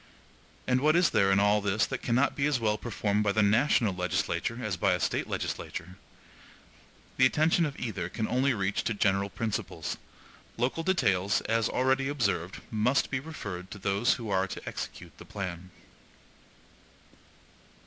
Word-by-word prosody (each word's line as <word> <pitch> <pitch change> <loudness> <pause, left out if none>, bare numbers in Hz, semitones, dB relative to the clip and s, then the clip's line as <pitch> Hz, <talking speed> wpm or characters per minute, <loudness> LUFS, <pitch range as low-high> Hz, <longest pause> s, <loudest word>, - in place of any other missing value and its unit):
And 130 0 +2
what 155 +2 +4
is 175 -2 +4
there 95 -1 +3
in 95 - +4
all 105 +1 +3
this 100 +1 +1
that 130 - -5
cannot 125 +5 +1
as 140 -2 +2
well 110 -2 +1
be - - -11
performed 105 -3 0
by 105 - +2
the 110 0 +3
national 110 0 +3
legislature 90 +3 -1
as 105 -4 -1
by 95 - +2
a - - 0
State - - -1
legislature? 90 +2 -4 1.2
The 130 - +6
attention 155 +4 +2
of 140 - -8
either 95 -7 -3
can 110 +3 -3
only 130 +1 +2
reach 100 -1 -1
to 115 - 0
general 100 0 +1
principles; 110 0 -3 0.6
local 125 +7 0
details, 105 - +2
as 115 0 0
already 130 +1 +1
observed, 100 - -1
must 120 +5 +1
be 140 - 0
referred 100 - -7
to - - -8
those 100 +4 +1
who 115 -4 -6
are 95 0 +2
to - - -8
execute - - -7
the - - -9
plan. 90 -2 -6
110 Hz, 160 wpm, -29 LUFS, 100-130 Hz, 1.2 s, The